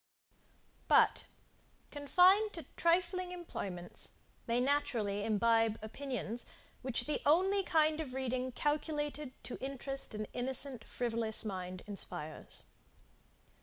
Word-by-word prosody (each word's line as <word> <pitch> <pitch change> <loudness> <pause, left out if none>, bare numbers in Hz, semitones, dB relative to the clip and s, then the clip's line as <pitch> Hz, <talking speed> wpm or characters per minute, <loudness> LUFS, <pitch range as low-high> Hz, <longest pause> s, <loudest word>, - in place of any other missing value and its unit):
But, - - +5 0.7
confined 365 +9 +5
to 330 -5 -7
trifling 360 +1 +2
employments, 195 - -5 0.3
they 235 +1 +2
naturally 240 -7 +1
imbibe 225 +1 +3
opinions 240 -1 -4 0.4
which 260 -2 -1
the 300 - -1
only 375 +7 +4
kind 315 -3 +3
of 260 -5 -6
reading 255 -1 -1
calculated 295 0 -1
to 250 - -7
interest 270 -2 -4
an 215 0 -3
innocent 255 -1 +1
frivolous 230 -2 -1
mind, 185 -3 -5
inspires. 175 -6 -7
260 Hz, 100 wpm, -34 LUFS, 225-305 Hz, 0.7 s, But